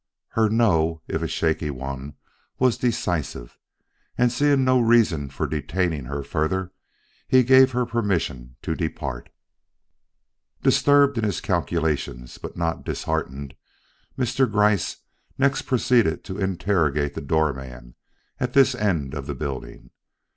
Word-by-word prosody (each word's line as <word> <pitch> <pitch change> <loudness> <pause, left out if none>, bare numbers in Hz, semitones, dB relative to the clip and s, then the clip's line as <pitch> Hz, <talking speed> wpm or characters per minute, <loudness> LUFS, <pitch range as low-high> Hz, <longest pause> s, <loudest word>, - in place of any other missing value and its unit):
Her 110 -1 +2
"no," 85 -8 +2
if - - -2
a - - -1
shaky 80 -2 -1
one, 70 +1 -6 0.4
was 130 -2 +2
decisive, 85 - -2 0.6
and 125 -1 +3
seeing 140 +1 +3
no 130 0 +4
reason 115 - +3
for 65 - -3
detaining 80 0 -2
her 70 +2 -4
further, 90 +6 -1 0.6
he 130 -1 +5
gave 130 +1 +6
her 125 0 +1
permission 85 - -2
to 80 - -1
depart. 80 -6 -4 1.3
Disturbed 140 -3 +4
in - - -2
his 100 -8 0
calculations, 60 -6 -2
but - - -8
not 85 -1 -2
disheartened, 70 +1 -3 0.6
Mr. 125 -1 +1
Gryce 105 -3 +2 0.4
next 140 0 +1
proceeded 120 -9 +2
to 95 +2 -7
interrogate 85 -7 0
the - - -5
door 80 -2 +1
man 65 -2 -10 0.5
at 125 0 -2
this 135 -1 +5
end 90 - -1
of 70 -2 -5
the - - -4
building. 70 -3 -6
85 Hz, 130 wpm, -24 LUFS, 70-120 Hz, 1.3 s, gave